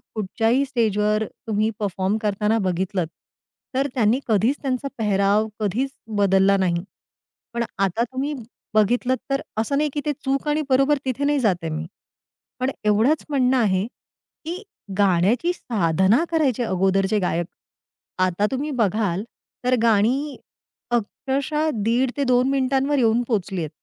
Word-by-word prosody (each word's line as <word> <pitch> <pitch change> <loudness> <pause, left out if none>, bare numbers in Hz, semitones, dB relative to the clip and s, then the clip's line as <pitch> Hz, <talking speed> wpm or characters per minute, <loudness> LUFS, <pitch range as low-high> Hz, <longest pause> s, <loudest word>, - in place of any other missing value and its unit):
कुठच्याही 225 +5 +1
स्टेज 230 -6 0
वर 210 +1 +2 0.2
तुम्ही 215 0 +1
परफॉर्म 195 0 -1
करताना 210 +1 +1
बघितलत 185 -2 -1 0.7
तर 270 +2 +2
त्यांनी 235 0 +2
कधीच 225 +4 +2
त्यांचा 265 0 -2
पेहराव 205 0 +2
कधीच 220 +6 0 0.3
बदलला 195 0 +4
नाही. 175 -3 0 0.7
पण 235 0 0 0.2
आता 195 +4 +1
तुम्ही 265 +4 -3 0.4
बघितलत 245 +4 +2
तर 275 0 0 0.2
असं 225 +6 0
नाही 300 +1 +1
की 290 - -2
ते 300 - +1
चूक 275 +2 0
आणि 300 +1 +1
बरोबर 275 +3 +4
तिथे 260 +1 -2
नाही 290 0 +2
जात 215 -7 +3
आहे 165 - -2
मी. 155 +1 -3 0.7
पण 255 +2 0
एवढंच 220 +9 +3
म्हणणं 265 -2 +2
आहे 195 -5 +2
की 335 +8 -11 0.4
गाण्याची 205 - +3
साधना 195 - +2
करायचे 280 -7 +1
अगोदरचे 195 -1 +1
जे - - +3
गायक. 175 -2 0 0.7
आता 185 +2 +2
तुम्ही 280 +3 -2
बघाल 205 -3 +1 0.4
तर 250 0 +4
गाणी 235 +7 +2 0.5
अक्षरशः 275 +6 -1
दीड 245 +4 +2
ते 285 - +1
2 250 -1 +3
मिनिटांवर 270 +1 +1
येऊन 230 -2 +3
पोहचली 195 -5 -1
आहेत. 155 - -3
225 Hz, 140 wpm, -23 LUFS, 200-270 Hz, 0.7 s, बदलला